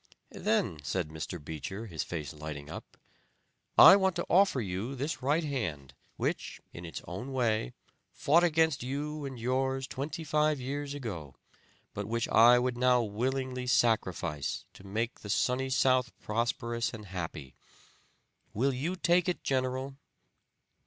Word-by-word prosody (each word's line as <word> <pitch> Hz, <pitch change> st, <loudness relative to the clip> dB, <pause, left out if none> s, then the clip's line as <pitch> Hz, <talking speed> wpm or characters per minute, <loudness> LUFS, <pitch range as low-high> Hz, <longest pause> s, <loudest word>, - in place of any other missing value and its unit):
'Then,' 75 Hz, -, 0 dB
said 80 Hz, +1 st, -2 dB, 0.3 s
Beecher, 80 Hz, -, -5 dB
his 85 Hz, -7 st, -4 dB
face 75 Hz, -6 st, -5 dB
lighting 75 Hz, -1 st, -7 dB
up, -, -, -9 dB, 0.8 s
'I 195 Hz, -, +11 dB
want 190 Hz, -2 st, +1 dB
to 175 Hz, -, -2 dB
offer 190 Hz, -6 st, +5 dB
you 105 Hz, +5 st, -3 dB
this 140 Hz, +5 st, -3 dB
right 145 Hz, +6 st, +2 dB
hand 90 Hz, -, -3 dB, 0.2 s
which, -, -, -2 dB
in 85 Hz, -, -8 dB
its 80 Hz, -, -7 dB
own 100 Hz, +10 st, -6 dB
way, 110 Hz, -, 0 dB, 0.4 s
fought 165 Hz, +5 st, +3 dB
against 160 Hz, -3 st, +3 dB
you 145 Hz, +4 st, -3 dB
and 135 Hz, -2 st, -6 dB
yours 130 Hz, +2 st, 0 dB
twenty 145 Hz, +5 st, -5 dB
five 150 Hz, -1 st, +2 dB
years 140 Hz, +2 st, -4 dB
ago, 90 Hz, -, -6 dB, 0.6 s
but 100 Hz, 0 st, -4 dB
which 115 Hz, +1 st, -1 dB
I 120 Hz, +3 st, +7 dB
would 125 Hz, 0 st, 0 dB
now 125 Hz, -1 st, +4 dB
willingly 125 Hz, +4 st, -2 dB
sacrifice 90 Hz, -, +1 dB
to -, -, -15 dB
make 110 Hz, +5 st, -3 dB
the 105 Hz, -, -9 dB
Sunny 130 Hz, +5 st, +1 dB
South 130 Hz, -2 st, +3 dB
prosperous 115 Hz, +1 st, -1 dB
and 105 Hz, -1 st, -9 dB
happy. 85 Hz, -8 st, -6 dB, 1.0 s
Will 135 Hz, +6 st, +2 dB
you 155 Hz, +9 st, -2 dB
take 180 Hz, 0 st, +2 dB
it, 180 Hz, -, -3 dB
General?' 130 Hz, +1 st, -1 dB
125 Hz, 140 wpm, -30 LUFS, 100-140 Hz, 1.0 s, I